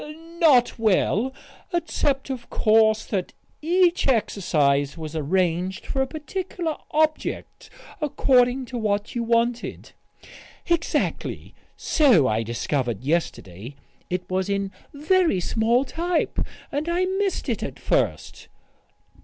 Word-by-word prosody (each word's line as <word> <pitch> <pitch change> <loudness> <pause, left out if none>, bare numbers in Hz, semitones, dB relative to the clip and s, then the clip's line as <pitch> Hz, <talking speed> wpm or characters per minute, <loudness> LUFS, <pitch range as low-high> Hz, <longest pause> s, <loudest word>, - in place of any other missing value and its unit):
"Not 255 -8 +4
well. 220 +3 +2 0.4
Except, 290 -6 -1
of 245 -2 -6
course, 220 0 +3
that 190 -4 -3 0.3
each 350 +2 +2
exercise 150 - +1
was 160 -1 -7
arranged 180 +3 -1
for 270 - -1
a 265 - 0
particular 325 +2 -4
object, 310 0 -1 0.3
according 255 -3 +2
to 245 0 -5
what 205 -1 -1
you 240 - -2
wanted." 235 +1 -1 0.8
"Exactly. 340 -1 -1 0.2
So 245 - +4
I 110 0 +1
discovered 120 +2 -2
yesterday. 130 - -3 0.3
It 180 0 -3
was 185 +1 -1
in 200 -1 -1 0.2
very 320 - +2
small 230 +7 +1
type, 335 +6 -1 0.3
and 295 +4 -2
I 355 +2 +1
missed 385 +1 -1
it - - -1
at - - -5
first." - - -1
235 Hz, 110 wpm, -24 LUFS, 180-305 Hz, 0.8 s, Not